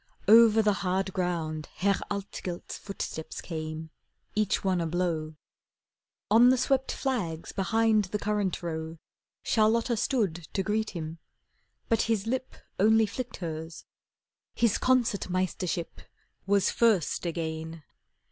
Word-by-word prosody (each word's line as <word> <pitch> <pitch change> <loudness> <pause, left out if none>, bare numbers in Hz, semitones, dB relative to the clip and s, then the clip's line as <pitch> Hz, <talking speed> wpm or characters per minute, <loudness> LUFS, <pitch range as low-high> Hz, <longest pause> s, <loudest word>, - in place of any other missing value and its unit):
Over 225 0 +7
the 210 -1 +3
hard 190 0 -1
ground 165 -4 -2
Herr 200 +1 +1
Altgelt's 195 -3 -5
footsteps 180 -5 -6
came, 155 -1 -5 0.4
each 210 -1 +1
one 185 -3 +1
a 165 - -1
blow. 160 -2 -1 1.0
On 235 +3 +7
the 260 - +4
swept 265 +1 +1
flags 185 - -2
behind 220 +2 +2
the 200 +3 -3
currant 205 -3 -1
row 160 -1 -4 0.5
Charlotta 230 +2 +2
stood 195 - -1
to 195 - 0
greet 215 +2 0
him. 160 0 -6 0.7
But 225 - +2
his 220 -3 +1
lip 255 +3 -3 0.2
Only 220 +2 +5
flicked 245 +2 -5
hers. 160 0 -6 0.7
His 230 -3 +2
Concert 240 -7 +2
Meistership 180 -1 -2 0.5
Was 200 -1 +3
first 205 -7 +2
again. 160 -1 -4
195 Hz, 120 wpm, -28 LUFS, 165-220 Hz, 1.0 s, Over